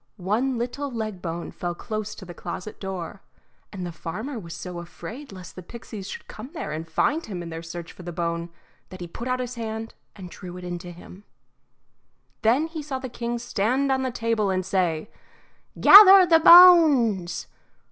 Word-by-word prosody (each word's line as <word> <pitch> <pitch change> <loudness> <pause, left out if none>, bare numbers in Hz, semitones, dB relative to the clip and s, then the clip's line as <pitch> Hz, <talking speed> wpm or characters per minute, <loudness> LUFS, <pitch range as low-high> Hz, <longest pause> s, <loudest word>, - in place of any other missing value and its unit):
One 225 +8 -1
little 250 +4 -4
leg 215 -6 -5
bone 170 0 -5
fell 175 -1 -5
close 215 +2 -5
to 190 - -11
the 175 - -9
closet 200 +4 -7
door, 190 0 -6 0.5
and 185 -3 -6
the 175 - -5
farmer 220 - -6
was 170 -5 -9
so 175 +3 -7
afraid 225 +10 -10
lest 185 -2 -11
the 185 - -8
pixies 200 0 -9
should - - -9
come 220 +5 -10
there 150 - -5
and 160 +2 -6
find 300 - 0
him 180 -5 -6
in 170 - -8
their 165 0 -6
search 170 0 -8
for - - -14
the 175 0 -7
bone, 170 0 -3 0.4
that 185 - -11
he 175 - -6
put 230 +8 -8
out 255 0 -1
his 250 -1 -4
hand 225 -1 -6 0.2
and 185 -3 -10
drew 180 -1 -9
it 180 - -10
in 175 -1 -5
to 175 0 -9
him. 180 +3 -14 1.2
Then 245 +7 +3
he 325 -1 -6
saw 285 -2 -5
the 260 0 -7
king 240 0 -4
stand 245 +4 -1
on 265 0 +1
the 260 - -1
table 230 -4 -1
and 185 -1 -1
say, 180 -2 -1 0.7
"Gather 390 -2 +10
the 330 -2 +5
bones!" 310 - +6
210 Hz, 190 wpm, -24 LUFS, 175-255 Hz, 1.2 s, Gather